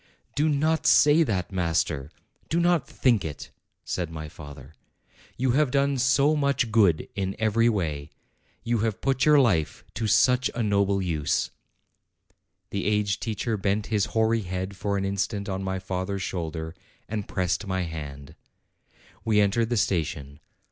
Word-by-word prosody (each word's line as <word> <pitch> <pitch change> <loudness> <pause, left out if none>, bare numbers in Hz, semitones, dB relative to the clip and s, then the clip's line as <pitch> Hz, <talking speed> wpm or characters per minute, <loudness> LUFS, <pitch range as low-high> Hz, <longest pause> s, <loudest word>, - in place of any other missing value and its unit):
"Do 150 +3 +1
not 155 +2 +1
say 150 +2 +6
that, 95 - -1
master; 80 -5 -1 0.4
do 165 - +1
not 175 -2 +2
think 115 -8 +2
it," 75 -3 -7 0.3
said 90 -3 -3
my 80 -1 -7
father. 70 -1 -12 0.6
"You 130 0 +1
have 145 +2 +3
done 140 0 +1
so 140 +4 +3
much 140 -5 +1
good 100 -8 +3
in 95 -1 -3
every 110 +2 +2
way! 80 -9 -2 0.5
You 120 -1 0
have 110 0 -1
put 135 +1 +1
your 150 -1 +6
life 90 - +1
to 110 - -2
such 125 +3 +3
a 120 - -1
noble 100 -2 +1
use!" 80 -5 -1 1.2
The 100 - -2
aged 105 -2 0
teacher 110 0 -2
bent 100 +1 -1
his 105 -2 +2
hoary 110 0 +1
head 95 +1 -4
for 100 +1 -2
an 95 - -1
instant 100 +1 -2
on 95 -1 -3
my 95 0 -2
father's 95 +1 -3
shoulder, 80 -2 -4 0.3
and 105 -2 -4
pressed 95 +2 -1
my 95 -1 -1
hand. 75 -3 -7 0.9
We 110 -2 +2
entered 105 +3 +2
the 120 - 0
station. 75 -7 -1
100 Hz, 155 wpm, -26 LUFS, 90-120 Hz, 1.2 s, say